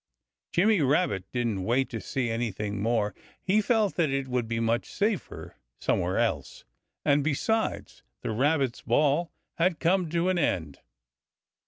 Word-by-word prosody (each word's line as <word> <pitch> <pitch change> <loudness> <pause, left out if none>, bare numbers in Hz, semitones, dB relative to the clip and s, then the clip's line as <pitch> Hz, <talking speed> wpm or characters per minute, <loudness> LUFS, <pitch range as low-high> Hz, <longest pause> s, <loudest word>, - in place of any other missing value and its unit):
Jimmy 205 +1 +3
Rabbit 140 - +1
didn't 115 -6 -1
wait 125 +6 +1
to 115 -3 -4
see 125 -3 -2
anything 105 -3 -2
more. 110 -1 +1 0.3
He 205 +3 +2
felt 215 -2 +1
that 165 -4 +2
it 135 0 -1
would 125 -2 -1
be 115 0 -2
much 115 +1 0
safer 205 -2 -2 0.2
somewhere - - 0
else. - - -1 0.4
And 145 0 +3
besides, 220 +10 -1 0.2
the - - -3
Rabbits' 135 +2 +1
Ball 145 +7 +2 0.3
had 170 -1 +2
come 180 0 +2
to 170 +3 +1
an 185 -1 +1
end. 80 - -1
135 Hz, 145 wpm, -27 LUFS, 115-175 Hz, 0.4 s, Jimmy